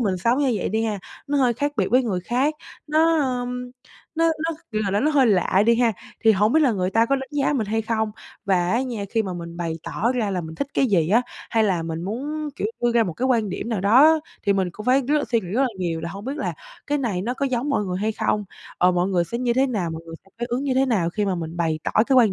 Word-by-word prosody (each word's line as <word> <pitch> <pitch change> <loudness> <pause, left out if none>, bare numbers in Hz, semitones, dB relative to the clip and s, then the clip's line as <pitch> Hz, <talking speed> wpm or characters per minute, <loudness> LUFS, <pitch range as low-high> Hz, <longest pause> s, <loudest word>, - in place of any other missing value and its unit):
mình 185 - -1
sống 235 +8 +2
như 275 -3 +2
vậy - - -2
đi 220 +2 0
ha, 210 -3 -2 0.3
nó 285 0 0
hơi 255 -3 +3
khác 285 +4 -1
biệt 195 - +1
với 255 +2 +4
người 200 -7 -1
khác, 255 - 0 0.3
nó, 320 +2 +3 0.2
ưm, 250 0 -5 0.4
nó 330 +1 +2
nó, 320 0 -1 0.2
kiểu 215 - 0
là 195 - 0
là 205 - +1
nó 300 +3 +2
hơi 275 -4 +4
lạ 190 -1 +3
đi 235 0 +5
ha, 235 -2 +3 0.3
thì 220 - +7
hổng 210 +3 +2
biết 315 - +4
là 265 -6 +4
người 185 -2 -1
ta 225 +3 +3
có 275 - +2
đánh 265 0 -6
giá 290 -1 +1
mình 240 -7 0
hay 225 +2 -1
không? 220 -1 -1 0.3
Và 180 -3 +2
á 235 +5 +2
nha, 235 -6 -4
khi 225 -1 +1
mà 190 -3 -4
mình 170 -1 -7
bày 170 -2 -2
tỏ 235 +4 -1
ra 230 -5 -1
là 185 -2 -1
mình 160 -1 -8
thích 280 - -2
cái 270 - +3
gì 170 -7 +2
á, 230 +5 +4 0.3
hay 225 -2 +3
là 180 -5 +1
mình 165 0 -4
muốn, 290 - -4
kiểu, - - -1 0.2
đưa 240 - +3
ra 235 -1 +4
một 185 -6 -2
cái 250 +11 -2
quan 230 -5 +2
điểm 210 - -4
nào 220 -5 -1
đó 275 +11 +6 0.2
thì 200 - +2
mình 190 -2 0
cũng 215 +5 -9
phải 265 +2 +4
rất 300 0 +3
là - - -1
suy 230 - +4
nghĩ 185 - -9
rất 240 - +1
là 265 - +2
nhiều 170 -3 -2
là 170 - -4
hông 200 +3 -8
biết 275 +4 -4
là - - -2 0.3
cái 290 0 0
này 210 -9 -1
nó 245 +4 -2
có 275 - -1
giống 260 +2 -1
mọi 245 -7 +1
người 180 -1 -3
hay 220 +1 0
không? 210 -1 -1 0.3
Ờ, 180 +1 +4
mọi 180 +1 +1
người 180 -3 +1
sẽ 235 +7 -4
như 245 -1 +1
thế 260 +3 +3
nào? 200 -10 -2
Mọi 160 0 -6
người 165 - -8
sẽ - - -22
phản 240 - -2
ứng 245 +2 -1
như 265 - 0
thế 265 +1 +3
nào 190 -9 +1
khi 210 +4 -1
mà 195 -2 0
mình 165 -1 -5
bày 165 -2 0
tỏ - - -1 0.2
cái 270 - +3
quan 225 -6 +5
225 Hz, 300 wpm, -23 LUFS, 190-260 Hz, 0.4 s, thì